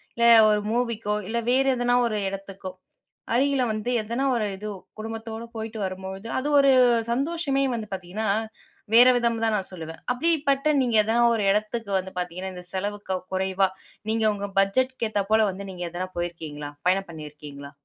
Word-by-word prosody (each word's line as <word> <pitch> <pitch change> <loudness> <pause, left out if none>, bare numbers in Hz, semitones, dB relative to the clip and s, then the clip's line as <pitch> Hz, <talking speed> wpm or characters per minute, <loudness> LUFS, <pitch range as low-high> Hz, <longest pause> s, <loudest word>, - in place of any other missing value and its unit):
இல்ல 235 - 0 0.3
ஒரு 210 0 +2
மூவிக்கோ, 230 -3 -1
இல்ல 235 - -2
வேற 265 +2 +3
எதனா 245 0 +2
ஒரு 215 -2 -2
இடத்துக்கோ 195 -1 -7 0.6
அருகில 270 +1 +2
வந்து 215 +2 -2
எதனா 235 +5 -2
ஒரு 225 -3 0
இது 210 +3 -7 0.3
குடும்பத்தோட 225 +1 -6
போயிட்டு 220 0 -5
வரும்போது 190 +2 -5
அது 270 - -3
ஒரு 275 -1 +6 0.4
சந்தோஷமே 275 +1 0
வந்து 225 -2 -4
பாத்தீங்கனா 190 +4 -4 0.7
வேற 240 +2 +9
விதம்னு 235 -2 0
தான் 220 -1 +2
நா - - 0
சொல்லுவேன். 165 -3 -8
அப்படிப்பட்ட 285 0 +1
நீங்க 240 -3 0
எதனா 225 +3 +2
ஒரு 210 -3 0
எடத்துக்கு 215 +1 -2
வந்து 190 0 -5
பாத்தீங்கனா 180 +2 -4
இந்த 180 0 -8
செலவு 205 +2 -3 0.3
குறைவா 190 0 +1 0.4
நீங்க 225 0 +1
உங்க 200 0 -5
பட்ஜெட்டுக்கு 235 +4 +1
ஏத்தா 205 -2 +1
போல 220 -1 +5
வந்து 195 +1 -8
நீங்க 180 -1 -6
எதனா 175 +2 -4
போயிருக்கீங்களா? 160 -4 -5 0.2
பயணம் 190 0 +1
பண்ணியிருக்கீங்களா? 150 -3 -9
215 Hz, 160 wpm, -25 LUFS, 190-235 Hz, 0.7 s, வேற